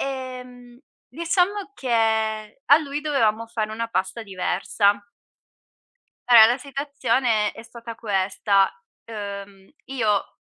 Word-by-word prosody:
ehm, 250 Hz, -2 st, -7 dB, 0.3 s
diciamo 360 Hz, +5 st, -1 dB
che 220 Hz, -2 st, 0 dB
a 285 Hz, +2 st, +7 dB
lui 290 Hz, -1 st, -4 dB
dovevamo 230 Hz, -7 st, +1 dB
fare 215 Hz, -2 st, -3 dB
una 230 Hz, +1 st, -3 dB
pasta 225 Hz, +1 st, -2 dB
diversa. 200 Hz, +1 st, 0 dB, 1.3 s
Allora 230 Hz, -3 st, +9 dB
la 245 Hz, +3 st, +1 dB
situazione 260 Hz, -5 st, 0 dB
è -, -, -11 dB
stata 230 Hz, 0 st, -10 dB
questa: 195 Hz, -2 st, +1 dB, 0.3 s
uhm, 200 Hz, -3 st, -8 dB, 0.2 s
io 220 Hz, -7 st, -1 dB
230 Hz, 105 wpm, -23 LUFS, 210-265 Hz, 1.3 s, Allora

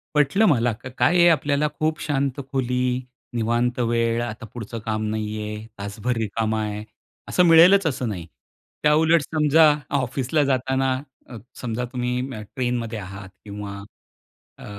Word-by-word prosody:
पटलं 150 Hz, +10 st, +4 dB
मला. 120 Hz, -6 st, +3 dB
का 110 Hz, +4 st, -9 dB
काय 175 Hz, -, +3 dB
आहे 175 Hz, 0 st, +7 dB
आपल्याला 145 Hz, -1 st, +2 dB
खूप 155 Hz, 0 st, 0 dB
शांत 140 Hz, -2 st, -1 dB
खोली, 125 Hz, -1 st, 0 dB, 0.3 s
निवांत 120 Hz, +2 st, 0 dB
वेळ 115 Hz, 0 st, +1 dB
आता 115 Hz, -1 st, -6 dB
पुढचं 115 Hz, 0 st, -7 dB
काम 110 Hz, 0 st, -1 dB
नाहीये, 105 Hz, 0 st, -4 dB
तासभर 100 Hz, +5 st, -3 dB
रिकामा 110 Hz, 0 st, -1 dB
आहे 105 Hz, 0 st, -4 dB, 0.4 s
असं 180 Hz, -, +3 dB
मिळेलच 170 Hz, +3 st, +7 dB
असं 130 Hz, -5 st, -1 dB
नाही. 90 Hz, -5 st, -5 dB, 0.6 s
त्याउलट 160 Hz, +2 st, +4 dB
समजा 155 Hz, +1 st, +4 dB, 0.3 s
ऑफिसला 130 Hz, +4 st, 0 dB
जाताना 130 Hz, 0 st, +1 dB, 0.4 s
अ, 120 Hz, -, -9 dB, 0.2 s
समजा 125 Hz, 0 st, -3 dB
तुम्ही 125 Hz, 0 st, -1 dB, 0.4 s
ट्रेनमध्ये 120 Hz, -3 st, -2 dB
आहात 95 Hz, 0 st, -8 dB, 0.2 s
किंवा 100 Hz, -1 st, -7 dB, 0.8 s
अ, -, -, -12 dB
125 Hz, 135 wpm, -23 LUFS, 110-145 Hz, 0.8 s, आहे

